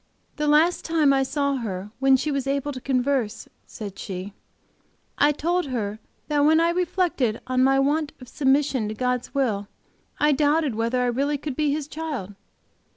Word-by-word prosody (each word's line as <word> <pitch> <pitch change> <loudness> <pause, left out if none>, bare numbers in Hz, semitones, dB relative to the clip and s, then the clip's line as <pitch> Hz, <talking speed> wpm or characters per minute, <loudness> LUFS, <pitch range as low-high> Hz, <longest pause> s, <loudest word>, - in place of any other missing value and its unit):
"The 300 0 -1
last 310 +4 +3
time 315 -4 +3
I 270 - +3
saw 280 +1 0
her 205 -4 -5
when 270 0 +5
she 300 +4 -2
was 275 -1 -2
able 280 +1 -1
to 255 -2 -7
converse," 255 -3 -1 0.2
said 205 -4 -8
she, 190 +1 -6 0.9
"I 290 - +5
told 345 +3 -1
her 215 -5 -3 0.3
that 295 -1 +1
when 315 +2 +5
I 335 +1 +3
reflected 345 - 0
on 255 0 +1
my 270 +1 +4
want 290 +2 +1
of 250 - -12
submission 270 -3 +1
to 215 - -4
God's 250 +3 -2
will, 215 -7 0 0.5
I 300 0 +4
doubted 295 -1 +2
whether 230 +3 0
I - - +1
really 275 +4 0
could 285 -1 -5
be 300 0 +1
His 290 -1 -2
child. 295 -11 -5
275 Hz, 175 wpm, -24 LUFS, 245-300 Hz, 0.9 s, when